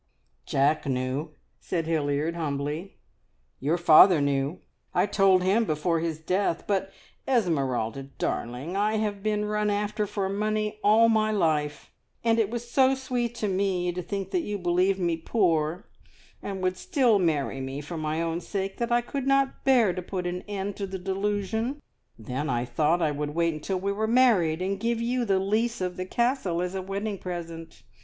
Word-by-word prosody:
"Jack 140 +2 +2
knew," 135 +4 -2 0.2
said 165 -2 -2
Hilliard 155 0 0
humbly. 150 +2 -3 0.6
"Your 150 +6 +1
father 175 +1 +7
knew. 140 +3 0 0.4
I - - +4
told 195 -2 +3
him 200 +5 +3
before 165 -2 0
his 165 -1 -2
death. 175 +1 -1
But, 195 -1 -1 0.4
Esmeralda 135 - 0 0.2
darling, 130 +10 -3
I 210 +2 +1
have 210 -2 -2
been 210 0 0
run 210 0 0
after 205 +1 -1
for 195 -1 -2
my 195 - -3
money 215 0 -1
all 220 +2 +6
my 220 -1 +3
life, 155 -8 0 0.3
and 230 0 +3
it 215 -3 +2
was 240 +1 -5
so 265 +2 +4
sweet 245 -3 -2
to 215 - -2
me 185 -2 0
to 180 +1 -4
think 195 +2 -4
that 365 - +1
you 210 -8 -3
believed 180 +1 +2
me 170 -2 0
poor, 165 -2 0 0.5
and 190 -2 -5
would 185 0 0
still 255 - +2
marry 145 -6 0
me 135 +1 -4
for 150 +4 -7
my 155 +1 -1
own 165 +1 -2
sake, 195 +1 -4
that 235 0 -2
I 240 0 +4
could 270 +2 -4
not 275 0 +2
bear 245 -8 +4
to 180 - -4
put 180 0 -4
an 180 0 -3
end 200 -1 -4
to 200 - -3
the 190 0 -5
delusion. 205 +7 -2 0.4
Then 125 +6 -4
I 120 -1 0
thought 155 +7 +1
I 155 - +2
would 145 +1 -4
wait 170 -1 +2
until 180 +5 -3
we 200 +2 -1
were 215 +2 -1
married, 210 -9 +3
and 195 +1 -2
give 230 +1 0
you 240 +1 0
the 195 -3 +2
lease 220 +5 0
of 180 -1 -2
the 185 0 -5
Castle 235 -7 0
as 180 +1 -2
a 190 - -3
wedding 200 +1 -4
present. 170 -2 -7
190 Hz, 180 wpm, -27 LUFS, 160-215 Hz, 0.6 s, father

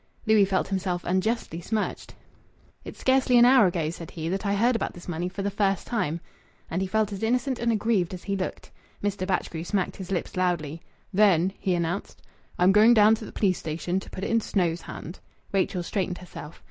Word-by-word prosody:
Louis 215 -2 +5
felt 190 -1 0
himself 185 -2 -2
unjustly 185 -1 -1
smirched. 215 +4 -3 0.7
"It's - - -9
scarcely 260 -1 +3
an 240 - +8
hour 250 -5 +7
ago," 165 -3 -1
said 165 -1 -8
he, 160 -1 -5
"that 195 +3 -2
I 200 - +1
heard 235 +4 +3
about - - -2
this 175 - -12
money 175 +1 -2
for 195 +2 -5
the 200 - -1
first 195 -2 0
time." 170 -9 -1 0.5
And 175 +3 -1
he 190 - -1
felt 215 +1 0
as 195 - -6
innocent 250 +3 0
and 235 0 +1
aggrieved 215 -5 +1
as 180 - -11
he 200 - -2
looked. 190 -1 -5 0.3
Mr. 200 -2 -1
Batchgrew 170 -3 -2
smacked 190 +1 -1
his 190 -2 -7
lips 180 - -2
loudly. 170 -4 -1 0.3
"Then," 190 -2 +4
he 185 -2 0
announced, 175 +3 -3 0.3
"I'm 180 +2 +5
going 215 +4 +6
down 215 0 +7
to 220 0 -4
th' - - -16
police 190 -4 +1
station, 170 +4 -2
to - - -11
put 190 - -7
it 230 - 0
i' - - +5
Snow's 175 -6 0
hands." 170 - -9 0.3
Rachel 190 -2 0
straightened 180 -1 -2
herself. 170 -3 -10
190 Hz, 205 wpm, -26 LUFS, 175-215 Hz, 0.7 s, an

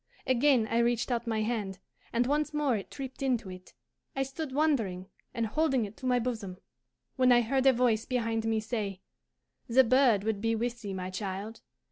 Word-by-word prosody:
Again 260 -2 +3
I 230 +1 0
reached 240 +1 +1
out 235 0 -1
my 220 -1 0
hand, 210 -4 -2 0.3
and 235 +1 +1
once 300 +3 0
more 290 -5 +2
it 200 - -5
tripped 265 -2 -8
into 245 -7 0
it. 185 0 -12 0.4
I 270 - +1
stood 270 +2 -5
wondering 250 -11 0 0.3
and 230 - -1
holding 265 -1 +1
it 205 +1 -10
to 260 - -5
my 250 -1 +3
bosom, 225 -6 -3 0.6
when 255 -1 +5
I 240 0 +6
heard 265 +3 +1
a 265 - +7
voice 235 -3 +2
behind 225 -3 -1
me 225 -1 +1
say, 210 -4 -4 0.7
'The 255 +3 +5
bird 245 -4 +4
would 215 -2 -1
be 225 +1 +1
with 240 +1 -3
thee, 200 -3 -5
my 185 0 -4
child. 200 +3 -5
235 Hz, 190 wpm, -30 LUFS, 215-260 Hz, 0.7 s, a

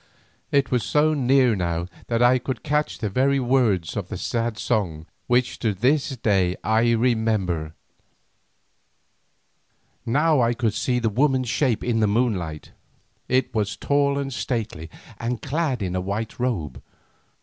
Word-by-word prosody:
It 140 -1 +2
was 125 -3 +1
so 155 +1 +2
near 130 -4 +3
now 85 -2 -2 0.2
that 115 0 +1
I 125 +1 +5
could 125 -1 -5
catch 150 0 0
the 110 - -2
very 135 +5 +2
words 120 -10 +1
of 100 -4 -3
that 105 - -5
sad 115 +3 -2
song 85 -9 -1 0.2
which 125 0 +1
to 110 -4 0
this 135 +5 +1
day 95 -5 +1
I 115 +2 +3
remember. 110 -9 0 2.3
Now 150 +3 +2
I 120 0 +2
could 115 -3 0
see 125 +2 0
the 115 -2 +1
woman's 130 +2 +1
shape 125 -3 +1
in 120 -2 0
the 110 - +3
moonlight; 100 -9 -1 0.6
it 130 0 +1
was 105 -2 -1
tall 140 0 +1
and 135 -1 -3
stately 110 -9 -3 0.3
and 120 0 -2
clad 145 -5 -1
in 90 -1 -2
a 90 - 0
white 105 +5 -4
robe. 90 - -2
115 Hz, 150 wpm, -23 LUFS, 100-130 Hz, 2.3 s, I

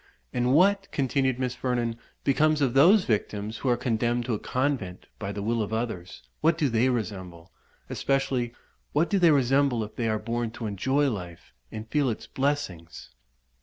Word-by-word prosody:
"And 125 +1 +1
what," 195 +4 +4
continued 135 -2 +1
Miss 125 -1 -1
Vernon, 120 -3 -1 0.3
"becomes 155 +2 +3
of 135 -4 +1
those 180 +9 +6
victims 105 -1 -2
who 130 - -1
are 120 - +3
condemned 120 0 0
to 120 - -1
a 105 - -1
convent 125 -9 -2
by 100 -2 -4
the 100 0 -5
will 115 +2 0
of 105 - -3
others? 110 -6 -4 0.2
what 165 +1 +3
do 150 -4 +1
they 115 +2 +2
resemble? 95 -7 -4 0.4
especially, 130 -3 0 0.4
what 160 +6 +2
do 200 - +3
they 175 -2 +6
resemble, 135 -3 +3
if 105 - -9
they 115 -2 -1
are 110 - +1
born 115 +1 -2
to 115 - -6
enjoy 130 +8 +1
life, 90 -5 -8 0.2
and 110 +1 -7
feel 145 +2 +1
its 110 - -4
blessings?" 135 - -3
120 Hz, 175 wpm, -27 LUFS, 110-140 Hz, 0.4 s, those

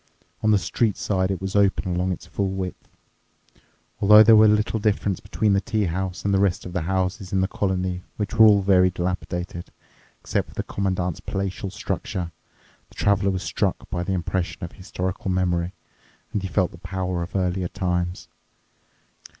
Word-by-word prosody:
On 110 - +2
the 105 - +5
street 105 +2 0
side 95 -2 0
it 95 -3 -2
was 95 +1 -4
open 100 -2 +2
along 90 +1 0
its 90 - -5
full 100 -1 -2
width. 95 -1 -5 1.1
Although 105 +2 +8
there 110 +1 +7
was 110 0 +7
little 105 +1 +1
difference 100 -2 0
between 105 0 0
the 100 - +3
tea 110 -1 -1
house 90 +2 -3
and 100 - +2
the 95 - +3
rest 100 -3 +1
of 90 - -7
the 90 - -1
houses 95 +2 -2
in 95 - +2
the 95 - +2
colony, 95 -2 -1 0.2
which 105 -1 -3
were 110 -1 +7
all 100 -2 +5
very 95 -1 +5
dilapidated, 90 -1 -4 0.5
except - - -2
for - - -16
the - - -2
Commandant's 95 -3 -2
palatial 95 0 -3
structure, 95 -2 -4 0.6
the - - -20
Traveler 100 -1 +2
was 95 -1 -2
struck - - -1
by 85 - -1
the 95 +2 -2
impression 90 0 -2
of 85 - -5
historical 95 0 -4
memory, 90 -1 0 0.6
and 105 - 0
he 95 - -3
felt 95 -1 +1
the 85 - -13
power 90 -1 -3
of 85 +3 -6
earlier 90 -1 0
times. 90 -1 -2
95 Hz, 180 wpm, -24 LUFS, 90-100 Hz, 1.1 s, Although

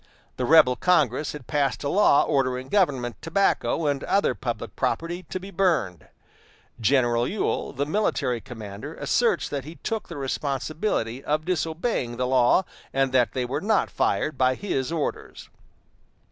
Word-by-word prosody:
The 125 - -1
rebel 150 -4 +6
Congress 150 -5 +1
had 150 -4 -9
passed 140 -1 0
a - - -1
law 160 -4 +4
ordering 130 -2 0
government 135 - +1
tobacco 165 -1 +1
and 140 -2 0
other 200 +1 +2
public 115 -4 -5
property 165 +6 -2
to 185 - -3
be 195 +2 -10
burned. 160 - 0 0.7
General 120 0 +2
Ewell, 210 - -2
the 140 +2 -2
military 145 - 0
commander, 110 -6 -8
asserts - - +1
that 140 -2 -3
he 155 +4 -10
took 225 -1 -3
the 170 - -8
responsibility 135 - -2
of 155 +1 -1
disobeying 160 - -1
the 125 - 0
law, 130 +7 +3 0.3
and 135 -1 +1
that 125 -2 +2
they 125 -1 -1
were 125 - -3
not 210 0 +1
fired 150 -4 0
by 130 0 +3
his 135 -6 -2
orders. 160 -3 -4
140 Hz, 150 wpm, -25 LUFS, 125-165 Hz, 0.7 s, rebel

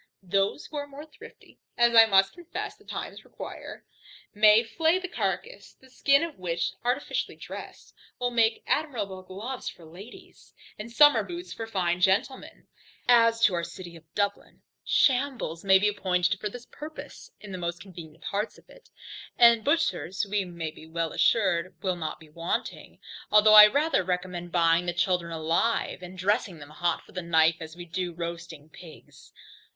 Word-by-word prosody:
Those 195 +7 0
who 300 - -8
are 285 0 -4
more 285 +2 -10
thrifty 310 - -16 0.2
(as 235 0 +4
I 225 0 +9
must 195 -2 +3
confess 350 -1 -7
the - - -23
times - - -7
require) - - -10 0.5
may 215 +2 +6
flay 320 +10 +1
the 370 0 -5
carcass; 200 - -4
the 260 -1 -20
skin 280 +3 +3
of 330 - -6
which, 170 -2 -2
artificially 250 +4 -2
dressed, - - -10 0.2
will 245 -1 -1
make 225 -1 +1
admirable 215 -11 -2
gloves 210 +8 -6
for 170 - -14
ladies, 185 +9 -14 0.2
and 225 +3 -7
summer 295 +4 +6
boots 350 +1 -7
for 225 - -6
fine 180 -4 -1
gentlemen. 205 +9 0 0.4
As 230 -1 +4
to 210 - +4
our 170 -1 -1
City 175 -1 -9
of 165 - -14
Dublin, 205 -1 -3 0.2
shambles 255 - +1
may 190 -1 +6
be 210 +2 +2
appointed 180 -3 0
for 210 - -3
this 245 +3 -10
purpose, 305 +4 -10
in 210 - -11
the 185 - -6
most 170 0 -4
convenient 170 -4 -12
parts 205 +2 -3
of - - -21
it, - - -19 0.5
and 235 -2 +6
butchers 220 - 0
we 205 0 0
may 170 -3 -6
be 160 +1 -15
assured 170 +2 +1
will 185 -2 0
not 160 -3 -5
be 160 - -16
wanting; 170 +2 -4 0.3
although 210 0 +6
I 210 0 +11
rather 290 0 +1
recommend 180 -1 -4
buying 170 0 +2
the 175 - -1
children 175 -1 0
alive, 165 +7 -1
and 180 +1 -10
dressing 195 -1 0
them 145 0 -12
hot 170 +2 -1
from - - -19
the 185 - -4
knife, 165 -1 +3
as 160 0 -9
we 175 0 -9
do 175 +1 -4
roasting 170 -3 -7
pigs. 160 +1 -15
195 Hz, 170 wpm, -27 LUFS, 170-235 Hz, 0.5 s, I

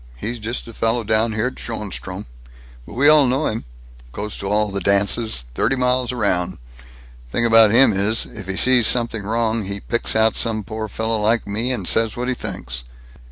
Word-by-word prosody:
He's 115 - -5
just 115 +3 -4
a 115 - -10
fellow 115 +2 0
down 110 +1 +1
here 105 +2 -1
at 130 - -4
Schoenstrom. 105 -4 -5 0.6
But - - -11
we 140 +4 +3
all 150 -3 +6
know 135 +5 0
him. 110 +1 -3 0.5
Goes 105 +9 -5
to 95 - -4
all 105 0 +1
the 100 - -2
dances, 100 - +1
thirty 135 - 0
miles 125 -1 0
around. 100 -7 -1 0.7
Thing 120 - 0
about 115 -1 +6
him 115 +1 +5
is: 100 +3 +1
if 105 -4 -10
he 95 - -3
sees 125 +1 +4
something 115 -3 +2
wrong, 110 +1 -1
he 100 +1 -5
picks 120 +3 -1
out 110 -1 +3
some 110 -2 0
poor 110 +1 -5
fellow 110 +1 -2
like 110 +2 +1
me, 110 +5 -2
and 125 - -3
says 115 -1 +2
what 125 +1 -3
he 130 - 0
thinks." 95 - -6
110 Hz, 195 wpm, -20 LUFS, 105-120 Hz, 0.7 s, all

